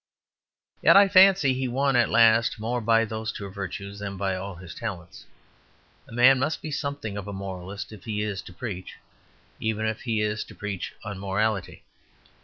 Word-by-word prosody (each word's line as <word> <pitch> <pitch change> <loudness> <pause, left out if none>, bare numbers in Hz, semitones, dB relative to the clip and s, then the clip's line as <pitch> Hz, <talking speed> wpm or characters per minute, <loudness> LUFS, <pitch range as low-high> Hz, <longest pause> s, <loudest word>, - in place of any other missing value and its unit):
Yet - - +7
I 200 0 +8
fancy 190 -7 +6
he 130 0 -2
won 135 +2 +1
at 120 -2 +4
last 115 -1 +4
more 120 +3 -2
by 115 0 +3
those 110 0 -4
two 100 - -7
virtues 100 +1 -6
than 100 -1 -5
by 95 -1 -1
all 95 +1 -6
his 85 -1 -10
talents. 90 -7 -7 0.8
A - - -16
man 125 +3 +6
must 155 +4 -1
be 155 - -6
something 140 -8 -4
of 100 -1 -6
a 100 - -5
moralist 95 +1 -6
if 105 - -13
he 105 -1 -2
is 100 -4 -3
to - - -11
preach, 95 -1 -7 0.6
even 110 0 -1
if 110 0 -2
he 110 -3 -1
is 105 +1 -1
to - - -14
preach 105 -3 -5
unmorality. 100 0 -2
110 Hz, 180 wpm, -26 LUFS, 100-120 Hz, 0.8 s, I